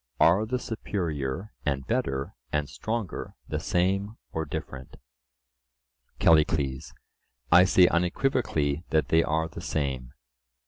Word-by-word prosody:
Are 95 Hz, +7 st, +5 dB
the 125 Hz, +3 st, 0 dB
superior 90 Hz, -, -3 dB
and 70 Hz, -2 st, -1 dB
better 75 Hz, -, -1 dB, 0.2 s
and 75 Hz, -1 st, 0 dB
stronger 110 Hz, +2 st, -4 dB
the -, -, -2 dB
same 100 Hz, +5 st, 0 dB
or 80 Hz, 0 st, -2 dB
different? 65 Hz, -4 st, -7 dB, 1.2 s
CALLICLES: 75 Hz, -4 st, +2 dB, 0.6 s
I 90 Hz, +1 st, +8 dB
say 95 Hz, -1 st, +6 dB
unequivocally 85 Hz, -, 0 dB
that 80 Hz, -1 st, +1 dB
they 80 Hz, -, +5 dB
are 80 Hz, 0 st, 0 dB
the -, -, -9 dB
same. 65 Hz, -4 st, -3 dB
80 Hz, 110 wpm, -27 LUFS, 70-100 Hz, 1.2 s, I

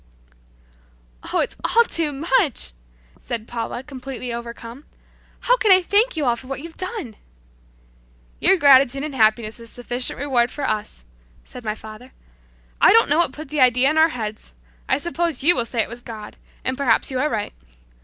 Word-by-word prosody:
'" -, -, -33 dB
"Oh, -, -, +2 dB
it's -, -, -3 dB
all 470 Hz, -, +4 dB
too 330 Hz, -9 st, -1 dB
much!" 295 Hz, -, 0 dB, 0.5 s
said 230 Hz, -2 st, -5 dB
Paula 240 Hz, +1 st, -5 dB
completely 260 Hz, -3 st, -7 dB
overcome. 235 Hz, +3 st, -8 dB, 0.6 s
"How -, -, +3 dB
can 435 Hz, -4 st, +2 dB
I 375 Hz, -, +8 dB
thank 415 Hz, +2 st, +2 dB
you 300 Hz, -, 0 dB
all 240 Hz, -2 st, +2 dB
for 255 Hz, +2 st, -12 dB
what 270 Hz, 0 st, -5 dB
you've 325 Hz, +2 st, -10 dB
done?" 370 Hz, -, -6 dB, 1.2 s
"Your 385 Hz, -, +4 dB
gratitude 275 Hz, -3 st, +5 dB
and 305 Hz, -1 st, -5 dB
happiness 220 Hz, -2 st, +1 dB
is 230 Hz, 0 st, -7 dB
sufficient 245 Hz, +1 st, -2 dB
reward 255 Hz, -4 st, +1 dB
for 285 Hz, +1 st, -4 dB
us," 210 Hz, -, -3 dB, 0.4 s
said 250 Hz, -, -12 dB
my 215 Hz, -1 st, -2 dB
father. 220 Hz, +4 st, -12 dB, 0.7 s
"I -, -, +7 dB
don't 455 Hz, -6 st, +5 dB
know 295 Hz, +3 st, +3 dB
what 345 Hz, -, +2 dB
put 305 Hz, +1 st, -10 dB
the 300 Hz, -1 st, -1 dB
idea 255 Hz, +2 st, +4 dB
in 310 Hz, -, -2 dB
our 320 Hz, +1 st, +5 dB
heads. 215 Hz, -5 st, -7 dB, 0.3 s
I 260 Hz, -, +3 dB
suppose 335 Hz, -2 st, -2 dB
you 345 Hz, +4 st, +6 dB
will 240 Hz, -, 0 dB
say 230 Hz, -1 st, 0 dB
it -, -, -7 dB
was 235 Hz, +1 st, -7 dB
God, 215 Hz, -3 st, -10 dB, 0.3 s
and 260 Hz, -, -1 dB
perhaps 255 Hz, -2 st, +2 dB
you 260 Hz, -, -2 dB
are 300 Hz, +3 st, +1 dB
right. 215 Hz, -6 st, -3 dB
255 Hz, 185 wpm, -21 LUFS, 230-300 Hz, 1.2 s, I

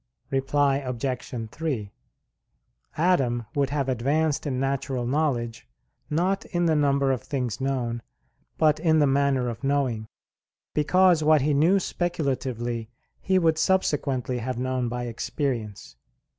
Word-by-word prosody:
Reply 135 Hz, +1 st, +2 dB
Obj. 125 Hz, -3 st, -4 dB
3: 135 Hz, -11 st, -3 dB, 1.1 s
Adam 135 Hz, -9 st, +2 dB
would 140 Hz, -2 st, +1 dB
have 140 Hz, -1 st, -1 dB
advanced 140 Hz, +5 st, 0 dB
in 130 Hz, -3 st, -1 dB
natural 135 Hz, -2 st, -1 dB
knowledge, 125 Hz, -, -1 dB, 0.4 s
not 185 Hz, +6 st, +1 dB
in 175 Hz, -1 st, -1 dB
the 160 Hz, -2 st, +3 dB
number 140 Hz, -2 st, +2 dB
of 130 Hz, -, -1 dB
things 130 Hz, -3 st, -3 dB
known, 125 Hz, -3 st, -1 dB, 0.6 s
but 155 Hz, -1 st, +3 dB
in 160 Hz, -1 st, +3 dB
the 150 Hz, -, +5 dB
manner 135 Hz, -2 st, +2 dB
of 115 Hz, +1 st, -5 dB
knowing; 135 Hz, -6 st, 0 dB, 0.7 s
because 175 Hz, +2 st, +4 dB
what 155 Hz, -1 st, +5 dB
he 150 Hz, +2 st, +2 dB
knew 165 Hz, +8 st, +4 dB
speculatively 130 Hz, -11 st, -2 dB, 0.3 s
he 190 Hz, 0 st, +1 dB
would 160 Hz, -3 st, +2 dB
subsequently 140 Hz, -9 st, +1 dB
have 125 Hz, +1 st, -3 dB
known 130 Hz, -1 st, -1 dB
by 125 Hz, +1 st, -3 dB
experience. 115 Hz, -, -4 dB
135 Hz, 130 wpm, -25 LUFS, 125-155 Hz, 1.1 s, the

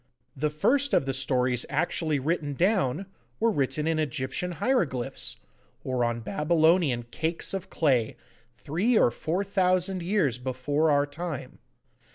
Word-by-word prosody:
The 150 Hz, +3 st, 0 dB
first 260 Hz, -, +2 dB
of -, -, +2 dB
the 135 Hz, -, -1 dB
stories 130 Hz, -1 st, +1 dB
actually 155 Hz, 0 st, 0 dB
written 145 Hz, 0 st, -1 dB
down, 185 Hz, -, +1 dB, 0.3 s
were 230 Hz, 0 st, +3 dB
written 145 Hz, -3 st, -1 dB
in 160 Hz, 0 st, +1 dB
Egyptian 150 Hz, +5 st, -2 dB
hieroglyphs, 130 Hz, -, -1 dB, 0.5 s
or 130 Hz, -2 st, -1 dB
on 120 Hz, 0 st, -1 dB
Babylonian 160 Hz, -, +2 dB
cakes 160 Hz, +6 st, -1 dB
of 190 Hz, 0 st, -4 dB
clay, 130 Hz, -8 st, +1 dB, 0.4 s
three 190 Hz, -, +1 dB
or 120 Hz, -, +4 dB
four 165 Hz, +10 st, -2 dB
thousand 185 Hz, -1 st, +1 dB
years 170 Hz, -, 0 dB
before 130 Hz, +5 st, 0 dB
our 145 Hz, -1 st, +3 dB
time. 155 Hz, 0 st, -6 dB
155 Hz, 135 wpm, -27 LUFS, 130-180 Hz, 0.5 s, or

